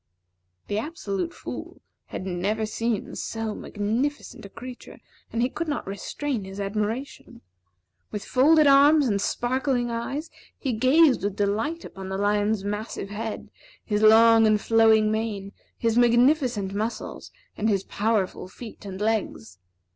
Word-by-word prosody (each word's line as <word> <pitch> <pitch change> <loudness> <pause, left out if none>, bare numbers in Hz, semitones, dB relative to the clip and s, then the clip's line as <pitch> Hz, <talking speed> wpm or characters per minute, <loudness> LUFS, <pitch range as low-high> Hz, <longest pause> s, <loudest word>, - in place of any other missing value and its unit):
The 205 - -1
Absolute 225 - -3
Fool - - -8 0.3
had - - -6
never 195 +4 -1
seen 225 0 -2
so 225 -1 -4
magnificent 230 +10 -3
a 200 - -9
creature, 250 +4 -10 0.3
and 230 +1 0
he 250 - +1
could 335 +5 -4
not 290 - -2
restrain 225 +5 -4
his 195 +1 -8
admiration. 215 +6 -4 0.7
With 210 - -6
folded 305 +4 +5
arms 285 +2 +6
and 200 -3 0
sparkling 245 +1 0
eyes, 275 +7 -4 0.3
he 265 -4 -2
gazed 260 +4 +4
with 200 -1 -1
delight 220 +12 -1
upon 190 0 -8
the 190 - -3
lion's 205 0 +1
massive 205 -1 -4
head, 220 +1 -5 0.3
his 210 -1 0
long 225 +1 +7
and 215 -1 +3
flowing 220 -1 +4
mane, 215 -3 -3 0.3
his 230 0 +1
magnificent 240 -4 +3
muscles, 220 +3 -4 0.3
and 220 - 0
his 195 -2 +1
powerful 205 -4 -1
feet 220 +4 -11
and 190 -1 -7
legs. 205 - -2
220 Hz, 140 wpm, -25 LUFS, 205-250 Hz, 0.7 s, long